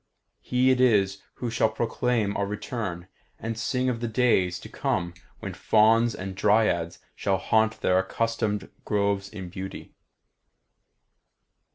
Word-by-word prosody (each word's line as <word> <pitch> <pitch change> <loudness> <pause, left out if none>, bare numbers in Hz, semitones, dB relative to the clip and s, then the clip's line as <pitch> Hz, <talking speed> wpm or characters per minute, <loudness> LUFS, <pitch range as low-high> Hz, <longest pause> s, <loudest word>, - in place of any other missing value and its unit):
He 125 +1 +2
it 130 -1 +2
is 100 -6 +3
who 120 -2 -4
shall 110 -1 +2
proclaim 115 -3 0
our 100 - 0
return, 105 -5 -4 0.3
and 115 0 -4
sing 125 +3 -1
of 125 -2 0
the 120 - -2
days 110 -7 +2
to - - -9
come 85 0 -2 0.3
when - - -5
Fauns 115 +2 +3
and 95 0 -5
Dryads 100 -5 +2 0.2
shall 95 -1 0
haunt 110 +3 +1
their 90 0 +3
accustomed 110 +1 -1
groves 100 -1 0
in 95 -4 -8
beauty. 95 +1 -8
105 Hz, 135 wpm, -26 LUFS, 95-115 Hz, 0.3 s, is